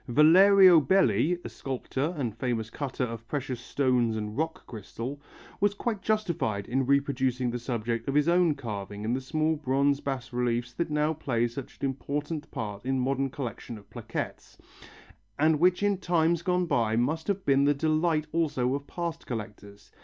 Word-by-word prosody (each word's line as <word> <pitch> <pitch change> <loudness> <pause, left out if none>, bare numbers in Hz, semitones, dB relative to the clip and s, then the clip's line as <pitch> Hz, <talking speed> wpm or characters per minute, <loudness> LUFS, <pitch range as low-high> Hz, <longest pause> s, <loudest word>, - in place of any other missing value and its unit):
Valerio 180 +6 +7
Belli, 155 - +3
a - - -4
sculptor 135 +4 -3
and 120 -7 -2
famous 115 -2 -2
cutter 135 -1 -3
of 115 -1 -5
precious 130 -3 -3
stones 125 -3 +1
and 105 0 -4
rock 160 +2 -3
crystal, 120 +5 -7 0.4
was 205 0 +2
quite 220 -2 -3
justified 170 - -1
in 130 +1 0
reproducing 130 -3 +1
the 120 - -3
subject 115 -1 -3
of 135 - -1
his 150 +1 +3
own 170 -3 +3
carving 105 -4 -6
in 115 - 0
the 130 - -1
small 155 +4 0
bronze 140 -1 +1
bas 130 -4 -4
reliefs 120 0 -1
that 170 - -2
now 150 +1 +1
play 120 -6 0
such 120 +2 -8
an - - -2
important 145 +3 -3
part 105 -3 -5
in 130 +1 0
modern 135 +1 0
collections 120 -3 -6
of 100 - -17
plaquettes, - - -6 0.8
and 155 0 +3
which 180 +3 +3
in 200 -2 +2
times 170 -2 +1
gone 180 0 +1
by 115 -9 +1
must 150 +8 0
have 200 -1 -1
been 140 0 +4
the 145 - +4
delight 155 +1 +1
also 145 -6 0
of 140 +1 -4
past 170 -1 -5
collectors. 105 -3 -8
135 Hz, 170 wpm, -28 LUFS, 120-160 Hz, 0.8 s, Valerio